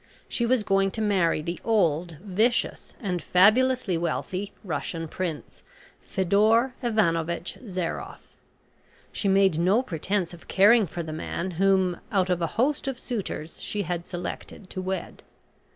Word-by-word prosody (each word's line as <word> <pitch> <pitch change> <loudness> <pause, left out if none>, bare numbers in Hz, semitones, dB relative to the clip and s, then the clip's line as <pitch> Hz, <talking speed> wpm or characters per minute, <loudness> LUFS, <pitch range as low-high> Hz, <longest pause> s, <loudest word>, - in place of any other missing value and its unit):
She 235 - -1
was 250 -2 +2
going 195 -1 +2
to - - -2
marry 185 -7 +2
the 170 +2 -4
old, 175 -6 +1
vicious, 215 +5 0
and 180 - -2
fabulously 215 +2 +4
wealthy 185 +4 -2
Russian 165 -1 -3
Prince, 165 -2 -5 0.4
Fedor 215 +6 +2
Ivanovitch 170 -8 0
Zairoff. 180 -3 -4 0.8
She 200 - -2
made 195 -4 +4
no 195 +8 +3
pretence 180 - -2
of 170 - -13
caring 210 +2 +5
for 170 +2 -5
the 155 -1 -6
man 170 +3 -3
whom, 190 0 +2
out 185 -3 +2
of 175 -1 0
a 165 - +1
host 275 +4 +1
of 270 -2 -2
suitors, 200 -11 -5
she 205 -1 -2
had 175 0 -4
selected 180 +1 -6
to 185 - -4
wed. 190 +1 -4
190 Hz, 140 wpm, -26 LUFS, 170-215 Hz, 0.8 s, caring